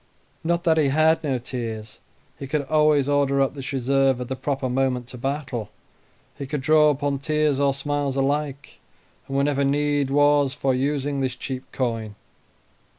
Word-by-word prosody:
Not 170 +1 0
that 165 -3 +3
he 150 - +3
had 155 +4 +3
no 135 -4 0
tears; 115 -3 -6 0.4
he 135 - -6
could 145 +1 -1
always 150 -2 +3
order 140 -1 +2
up 135 -1 +2
this 135 -2 -6
reserve 135 0 +2
at 125 - -5
the 130 - -2
proper 135 0 -2
moment 125 -1 0
to 125 - -8
battle; 135 -5 -3 0.7
he 140 - -6
could 145 0 -3
draw 155 +2 +5
upon 140 -1 -1
tears 150 -1 +1
or 140 -1 +3
smiles 140 0 -2
alike, 140 +1 -2 0.5
and 135 - -2
whenever 140 0 +1
need 145 0 +1
was 145 -1 +3
for 135 -2 0
using 140 +1 -1
this 130 -2 -1
cheap 130 0 -6
coin. 115 -5 -3
140 Hz, 165 wpm, -23 LUFS, 130-145 Hz, 0.7 s, draw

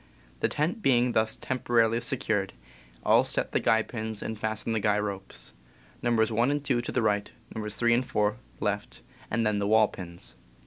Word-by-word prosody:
The - - +2
tent 165 +9 -1
being 125 -6 +3
thus 110 -1 +2
temporarily 120 -3 +1
secured, 110 -6 0 0.5
all - - +6
set - - -2
the - - +2
guy 110 0 +3
pins 110 -2 -5
and 110 - -3
fasten 110 +1 -2
the 110 - +1
guy 105 0 +2
ropes, 100 -2 -4 0.5
Nos. 115 -2 +2
1 115 +4 +2
and 145 0 -1
2 125 -4 +2
to 120 - -5
the 125 - 0
right, 105 -1 +1 0.2
Nos. 105 -1 -3
3 120 -1 +3
and 120 +2 +3
4 105 0 +1 0.2
left, - - -3 0.3
and 115 +1 0
then 105 -1 +1
the 100 - 0
wall 110 0 +5
pins. 85 -10 -8
110 Hz, 185 wpm, -28 LUFS, 105-120 Hz, 0.5 s, all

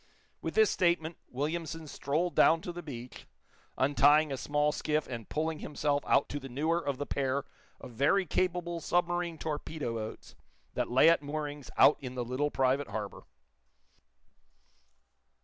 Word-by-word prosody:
With - - -4
this 435 -1 +5
statement, 170 -2 +1
Williamson 160 +4 -3
strolled 155 +5 -1
down 165 0 +5
to 175 - -5
the 175 0 -7
beach, 125 -6 -9 0.5
untying 145 +2 +4
a - - -1
small 145 +2 +1
skiff 155 0 -1
and 115 -4 -7
pulling 160 0 -2
himself 145 -1 -1
out - - +3
to 145 - -3
the 135 -1 -9
newer 155 +7 0
of 140 -2 -2
the 145 - -3
pair 135 0 -1 0.4
of - - -10
very 140 - +2
capable 175 0 -1
submarine 175 0 0
torpedo 150 -4 -4
boats 110 -1 -6 0.4
that - - -1
lay 130 +6 +5
at 165 -1 +5
moorings 145 -1 -5
out 150 - +7
in 130 -2 -7
the 125 -1 -2
little 130 +5 -1
private 135 +1 +1
harbor. 105 -1 -6
150 Hz, 150 wpm, -31 LUFS, 135-165 Hz, 0.5 s, out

